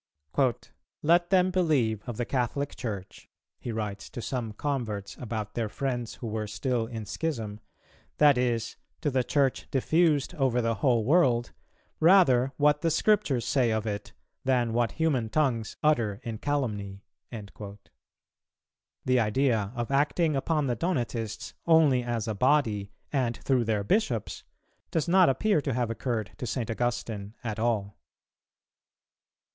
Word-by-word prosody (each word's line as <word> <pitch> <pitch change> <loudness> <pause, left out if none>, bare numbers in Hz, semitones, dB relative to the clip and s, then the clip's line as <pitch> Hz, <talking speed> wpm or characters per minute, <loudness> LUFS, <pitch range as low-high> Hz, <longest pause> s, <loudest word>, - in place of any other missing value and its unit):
"Let 175 +3 +4
them 185 0 +4
believe 145 - +1
of 115 - -5
the 120 - -1
Catholic 135 +3 -2
Church," 100 -6 -6 0.3
he 120 - -5
writes 105 -3 -4
to - - -8
some 120 -2 -3
converts 110 -5 -3
about 110 -3 -4
their 115 -3 -2
friends 120 -1 -3
who 120 - -7
were 110 -1 -3
still 120 +1 -1
in 115 -2 -6
schism, 110 -8 -3 0.6
"that 145 -2 +6
is, 120 -2 -1 0.2
to 150 -3 0
the 130 -1 +1
Church 135 0 0
diffused 155 +3 +2
over 135 -6 +1
the 115 -1 +1
whole 120 -4 +3
world, 125 -5 +3 0.5
rather 155 -8 +5
what 150 0 +3
the 165 - +2
Scriptures 165 - +2
say 130 -4 +2
of 110 0 -1
it 105 -2 -4 0.3
than 125 -3 +1
what 120 -1 +1
human 140 -9 0
tongues 120 -6 0
utter 115 -10 +2
in 115 -3 -5
calumny." 105 -9 -2 0.3
The 105 +4 -7
idea 110 -2 +1
of 120 +1 -3
acting 150 +3 +2
upon 150 +2 0
the 125 -3 0
Donatists 120 - -3
only 155 -6 +5
as 120 -2 -3
a 110 - -1
body 110 -4 +1 0.2
and 125 -4 0
through 130 -3 +1
their 105 -2 0
bishops, 125 - -1 0.5
does 160 +1 -1
not 180 -1 +5
appear 185 +4 +2
to 135 -4 -2
have 120 -2 0
occurred 115 -3 -3
to 125 - -5
St. 115 -3 -2
Augustine 115 -3 -3
at 110 -2 -4
all. 110 -4 -1
120 Hz, 140 wpm, -28 LUFS, 110-145 Hz, 0.6 s, that